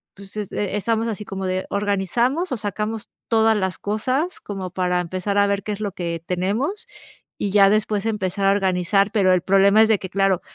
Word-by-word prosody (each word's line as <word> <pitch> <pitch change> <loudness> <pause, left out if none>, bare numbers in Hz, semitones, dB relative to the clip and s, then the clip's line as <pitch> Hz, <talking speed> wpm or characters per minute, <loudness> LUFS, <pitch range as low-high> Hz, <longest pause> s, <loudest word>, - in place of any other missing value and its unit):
pues 200 0 -12
es 205 -2 -4
e 205 -1 -2
estamos 225 +2 0
así 210 -2 -4
como 195 -1 -5
de: 185 0 -1
organizamos 210 - 0
o 255 - -1
sacamos 210 +1 -3 0.2
todas 225 -1 +4
las 190 -2 -1
cosas 255 - -1
como 195 -3 -5
para 180 -1 0
empezar 185 +3 -2
a 200 - +5
ver 200 0 0
qué 210 - -4
es 200 - -7
lo 210 -2 -2
que 170 -2 -4
tenemos 210 - -2 0.5
y 200 - -2
ya 200 -1 +6
después 215 0 0
empezar 200 -3 -1
a - - +5
organizar. 195 0 +1
Pero 190 -4 +3
el 180 - +2
problema 195 +3 +5
es - - +3
de 215 - +3
que, 190 - -7
claro, 195 -2 +1
200 Hz, 205 wpm, -22 LUFS, 190-215 Hz, 0.5 s, ya